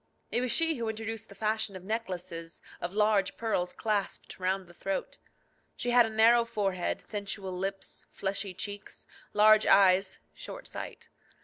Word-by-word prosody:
It 240 Hz, -, +1 dB
was 250 Hz, -1 st, 0 dB
she 325 Hz, -2 st, +4 dB
who 230 Hz, -2 st, -2 dB
introduced 225 Hz, 0 st, -5 dB
the 200 Hz, -, -12 dB
fashion 215 Hz, -1 st, 0 dB
of 185 Hz, -, -8 dB
necklaces 185 Hz, -6 st, -4 dB, 0.2 s
of 175 Hz, -, -2 dB
large 210 Hz, -2 st, +2 dB
pearls 180 Hz, -6 st, 0 dB
clasped 210 Hz, -4 st, -2 dB
round 190 Hz, +1 st, 0 dB
the 175 Hz, -, -16 dB
throat. 195 Hz, +2 st, -4 dB, 0.6 s
She 245 Hz, -, -1 dB
had 240 Hz, -1 st, +6 dB
a -, -, -3 dB
narrow 225 Hz, +2 st, +5 dB
forehead, 195 Hz, -5 st, -1 dB
sensual 200 Hz, -2 st, -4 dB
lips, 195 Hz, +1 st, -4 dB
fleshy 195 Hz, -1 st, -3 dB
cheeks, 205 Hz, +2 st, -5 dB, 0.3 s
large 215 Hz, +1 st, +6 dB
eyes, 190 Hz, 0 st, +5 dB, 0.2 s
short -, -, -9 dB
sight. 465 Hz, 0 st, -7 dB
205 Hz, 150 wpm, -30 LUFS, 190-225 Hz, 0.6 s, had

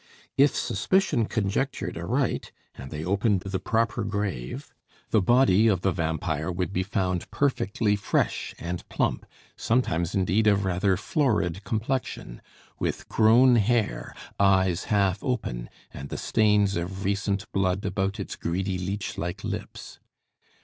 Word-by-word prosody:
If 140 Hz, +1 st, +4 dB
suspicion 190 Hz, -, +1 dB
conjectured 110 Hz, +6 st, -1 dB
aright, -, -, -1 dB, 0.2 s
and 65 Hz, -, -9 dB
they 75 Hz, +1 st, -5 dB
opened 100 Hz, +1 st, +1 dB
the 95 Hz, 0 st, -3 dB
proper 115 Hz, +3 st, 0 dB
grave, 100 Hz, -, -4 dB, 0.4 s
the 110 Hz, -, +4 dB
body 115 Hz, 0 st, +4 dB
of 95 Hz, -5 st, +2 dB
the 95 Hz, -, +2 dB
vampire 80 Hz, -1 st, -2 dB
would 90 Hz, +2 st, -2 dB
be 95 Hz, -, +1 dB
found 95 Hz, -2 st, -1 dB
perfectly 110 Hz, -6 st, +1 dB
fresh 100 Hz, -, -1 dB
and 85 Hz, +1 st, -5 dB
plump, -, -, -1 dB, 0.3 s
sometimes 85 Hz, -9 st, 0 dB
indeed 100 Hz, +3 st, +2 dB
of 100 Hz, -1 st, +3 dB
rather 95 Hz, +1 st, +1 dB
florid 105 Hz, -, 0 dB
complexion; 110 Hz, -, -3 dB, 0.4 s
with -, -, -2 dB
grown 120 Hz, +3 st, +5 dB
hair, 115 Hz, 0 st, 0 dB, 0.2 s
eyes 95 Hz, -2 st, +3 dB
half 100 Hz, -3 st, +1 dB
open, 85 Hz, -, -3 dB, 0.2 s
and 70 Hz, +1 st, -7 dB
the -, -, -4 dB
stains 105 Hz, -2 st, +2 dB
of 95 Hz, +3 st, -4 dB
recent 100 Hz, 0 st, -1 dB
blood 95 Hz, 0 st, 0 dB
about 95 Hz, 0 st, -1 dB
its -, -, -5 dB
greedy, 95 Hz, +2 st, -2 dB
leech 95 Hz, +2 st, -4 dB
like 85 Hz, +1 st, -4 dB
lips. -, -, -6 dB
100 Hz, 135 wpm, -26 LUFS, 90-110 Hz, 0.4 s, grown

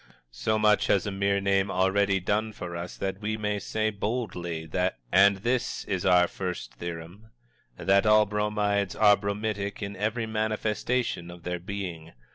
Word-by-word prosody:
So 110 Hz, -, 0 dB
much 105 Hz, 0 st, +3 dB
has 100 Hz, -, +2 dB
a 100 Hz, -, -2 dB
mere 100 Hz, 0 st, +1 dB
name 100 Hz, 0 st, +1 dB
already 95 Hz, +1 st, +2 dB
done 105 Hz, +4 st, -1 dB
for 90 Hz, -3 st, -6 dB
us 85 Hz, +1 st, -6 dB
that 95 Hz, +1 st, -3 dB
we 110 Hz, +1 st, -2 dB
may 105 Hz, -1 st, -1 dB
say, 110 Hz, +2 st, -1 dB
boldly, 95 Hz, -7 st, -3 dB, 0.4 s
and 100 Hz, +2 st, +6 dB
this 120 Hz, +5 st, -1 dB
is 95 Hz, -2 st, -1 dB
our 90 Hz, -1 st, +5 dB
First 90 Hz, -1 st, -5 dB
Theorem: 85 Hz, +5 st, -8 dB, 0.5 s
that 100 Hz, +2 st, +3 dB
all 105 Hz, 0 st, +6 dB
Bromides 105 Hz, -1 st, 0 dB
are 105 Hz, -1 st, +6 dB
bromidic 100 Hz, 0 st, -3 dB
in 100 Hz, 0 st, -5 dB
every 110 Hz, +4 st, -1 dB
manifestation 110 Hz, -2 st, -1 dB
of 85 Hz, -1 st, -11 dB
their 90 Hz, 0 st, -3 dB
being. 90 Hz, -4 st, -6 dB
100 Hz, 155 wpm, -27 LUFS, 95-105 Hz, 0.5 s, and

